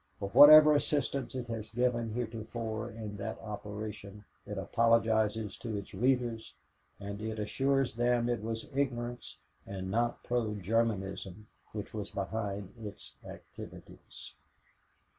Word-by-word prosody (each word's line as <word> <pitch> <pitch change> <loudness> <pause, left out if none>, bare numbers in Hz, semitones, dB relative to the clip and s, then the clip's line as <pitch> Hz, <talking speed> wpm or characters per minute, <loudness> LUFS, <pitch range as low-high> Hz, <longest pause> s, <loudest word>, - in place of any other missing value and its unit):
For 100 - -4
whatever 150 +6 +10
assistance 145 -2 0
it 125 -1 -3
has 110 -2 -4
given 120 -1 0
heretofore 115 -1 -4
in 110 -3 -7
that 100 - -4
operation 105 -1 -7 0.2
it 105 0 -5
apologizes 110 -1 +2
to 115 -3 -4
its 100 - -8
readers 120 +1 0 0.4
and 100 +1 -6
it 110 0 -4
assures 135 +5 +1
them 120 0 +2
it 120 -2 0
was 115 +1 -4
ignorance 120 -3 -2 0.3
and 95 -1 -5
not 120 +3 0
pro 115 -3 -1
Germanism 100 -1 -1 0.3
which 105 -1 -6
was 105 -2 -4
behind 100 -1 -4
its 105 -3 -9
activities." - - -11
110 Hz, 120 wpm, -32 LUFS, 105-120 Hz, 0.4 s, whatever